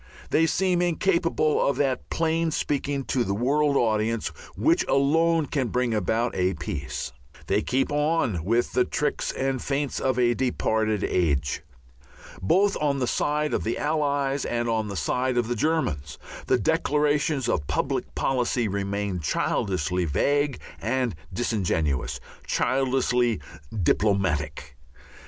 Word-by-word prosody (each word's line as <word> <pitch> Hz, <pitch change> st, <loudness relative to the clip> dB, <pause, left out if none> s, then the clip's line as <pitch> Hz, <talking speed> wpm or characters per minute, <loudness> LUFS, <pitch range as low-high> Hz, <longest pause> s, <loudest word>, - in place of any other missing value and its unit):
They 165 Hz, +1 st, +4 dB
seem 180 Hz, 0 st, +1 dB
incapable 170 Hz, -3 st, +1 dB
of 140 Hz, -, +1 dB
that 135 Hz, -3 st, 0 dB
plain 165 Hz, 0 st, +1 dB
speaking 145 Hz, -2 st, -1 dB
to 125 Hz, +1 st, 0 dB
the 100 Hz, -2 st, -1 dB
world 140 Hz, +5 st, +2 dB
audience 110 Hz, 0 st, +1 dB, 0.3 s
which 340 Hz, +3 st, +3 dB
alone 160 Hz, +3 st, +3 dB
can 135 Hz, -3 st, -1 dB
bring 125 Hz, -1 st, 0 dB
about 110 Hz, +3 st, 0 dB
a 90 Hz, 0 st, +1 dB
peace. 70 Hz, -7 st, -4 dB, 0.3 s
They 100 Hz, +6 st, +1 dB
keep 130 Hz, +6 st, 0 dB
on 145 Hz, -, +1 dB
with 115 Hz, +6 st, +1 dB
the 125 Hz, -, +4 dB
tricks 150 Hz, -, -1 dB
and 135 Hz, -1 st, -1 dB
feints 140 Hz, 0 st, -1 dB
of 130 Hz, -2 st, 0 dB
a 120 Hz, -1 st, +3 dB
departed 110 Hz, -4 st, 0 dB
age. 70 Hz, -7 st, 0 dB, 0.8 s
Both 195 Hz, -, +3 dB
on 145 Hz, -2 st, +1 dB
the 130 Hz, -, 0 dB
side 150 Hz, +5 st, 0 dB
of -, -, 0 dB
the 115 Hz, -, -1 dB
Allies 145 Hz, -2 st, 0 dB
and 120 Hz, 0 st, -1 dB
on 110 Hz, -2 st, 0 dB
the 100 Hz, -, -5 dB
side 125 Hz, +8 st, 0 dB
of 120 Hz, -2 st, +1 dB
the 120 Hz, -, -1 dB
Germans 105 Hz, -, -1 dB, 0.3 s
the -, -, +4 dB
declarations 145 Hz, -2 st, +1 dB
of 75 Hz, -10 st, -1 dB
public -, -, -2 dB
policy 125 Hz, -3 st, 0 dB
remain 100 Hz, -1 st, -2 dB
childishly 90 Hz, +3 st, 0 dB
vague 145 Hz, -, +1 dB, 0.2 s
and 125 Hz, 0 st, 0 dB, 0.2 s
disingenuous, 90 Hz, -, -1 dB, 0.3 s
childishly 125 Hz, -4 st, +1 dB, 0.4 s
"diplomatic." 80 Hz, -9 st, 0 dB
125 Hz, 135 wpm, -25 LUFS, 100-145 Hz, 0.8 s, They